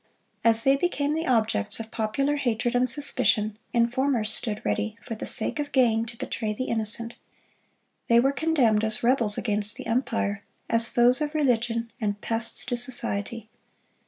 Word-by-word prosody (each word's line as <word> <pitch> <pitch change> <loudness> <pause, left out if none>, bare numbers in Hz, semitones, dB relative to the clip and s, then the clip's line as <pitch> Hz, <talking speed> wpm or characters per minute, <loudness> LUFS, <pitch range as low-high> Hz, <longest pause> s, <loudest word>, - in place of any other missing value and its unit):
As 230 0 +4
they 270 0 +4
became 290 -1 -1
the 320 +1 -2
objects 220 - +1
of 225 0 -7
popular 275 +7 -1
hatred 240 -2 -1
and 250 +1 +2
suspicion, 220 -6 +3
informers 235 -1 +1
stood 210 -2 -1
ready, 220 +1 -2
for 235 - -7
the 220 - -6
sake 225 - 0
of 290 -1 -3
gain, 230 -3 +2
to 230 0 -8
betray 225 -4 -3
the 235 - -4
innocent. 230 0 -3 0.9
They 235 0 +5
were 270 +3 +3
condemned 275 -9 +1
as 220 0 0
rebels 235 -4 +2
against 210 -1 0
the - - -8
empire, 225 -4 -1 0.3
as 230 0 +1
foes 245 +3 +3
of 300 +1 -3
religion, 235 -5 0
and 205 -1 -2
pests 230 +2 -2
to 245 - -2
society. 235 -3 -3
235 Hz, 160 wpm, -25 LUFS, 220-260 Hz, 0.9 s, They